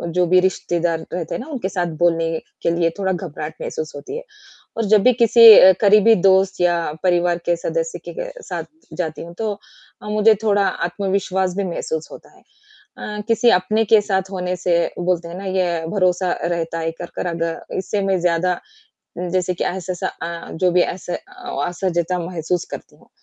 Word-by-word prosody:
जो 180 0 +3
भी 185 +2 +5
रिश्तेदार 175 -2 0
रहते 175 -2 -3
हैं - - -4
ना 260 - -9
उनके 240 -9 -3
साथ 180 -2 -1
बोलने 165 -1 +2 0.3
के 170 - +2
लिए 165 -1 +2
थोड़ा 190 -1 0
घबराहट 160 -4 -6
महसूस 155 0 -5
होती 145 - -7
है। - - -7 0.5
और 225 - 0
जब 210 - +5
भी 255 - +5
किसी 230 0 +9
अ, 190 - +9
करीबी 210 +2 +6
दोस्त 190 0 +3
या 175 -1 +3 0.3
परिवार 175 -1 +2
के 175 - +2
सदस्य - - -3
के - - -5
साथ - - -5 0.3
जाती 160 -3 -3
हूँ 170 +1 -10
तो 220 -2 -1 0.5
अ, - - -8
मुझे 215 +1 +4
थोड़ा 205 -2 +3
आत्मविश्वास 190 0 -1
भी 200 - -1
महसूस 160 -3 -4
होता - - -14
है। - - -22 0.6
अ, 210 0 -5
किसी 230 +1 +4
अपने 215 +3 +2
के 220 - +8
साथ 190 -2 -1
होने 180 -1 -2
से 175 -1 +1 0.2
बोलते 175 -1 -1
हैं 170 - -8
ना 195 - -7
ये 180 -3 -1
भरोसा 185 -2 +1
रहता 165 -1 -2
है 165 0 -1
कर 175 - -4
कर - - -3
अगर 165 -1 -3
इससे 200 +2 -2
मैं 195 -1 +1
ज़्यादा 175 +1 +1 0.6
जैसे 180 0 -1
कि - - -2
ऐसा-ऐसा 175 -2 -4
जो 180 - +4
भी 180 - +4
ऐसे 175 0 -4
अस - - -13 0.5
असहजता 175 0 -1
महसूस 170 0 -2
करती - - -9
हूँ। - - -24
180 Hz, 185 wpm, -20 LUFS, 170-195 Hz, 0.6 s, किसी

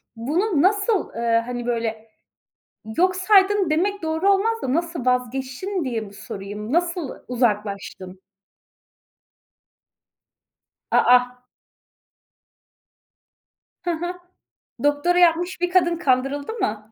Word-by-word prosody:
Bunu 305 - 0
nasıl, 405 +3 +2
ııı, 230 0 +1
hani, 245 -1 -5
böyle, 225 -2 -3 0.9
yok 370 +1 +3
saydın 390 -1 +4
demek 395 +6 0
doğru 320 +5 +1
olmaz 450 +3 0
da, 255 - -1
nasıl 335 -5 -2
vazgeçtin 260 - -1
diye 240 -4 -2
mi 205 -2 -9
sorayım? 205 +3 -7
Nasıl 340 -2 0 0.2
uzaklaştın? 205 -6 -2 2.7
A, - - +4 0.2
a. 250 0 0 2.4
Hı 350 - 0
hı. 350 +2 -3 0.7
Doktora 290 +5 +2
yapmış 350 +1 +2
bir 355 - +1
kadın 345 -2 +2
kandırıldı 280 +2 0
mı? 220 - -3
290 Hz, 100 wpm, -22 LUFS, 240-360 Hz, 2.7 s, saydın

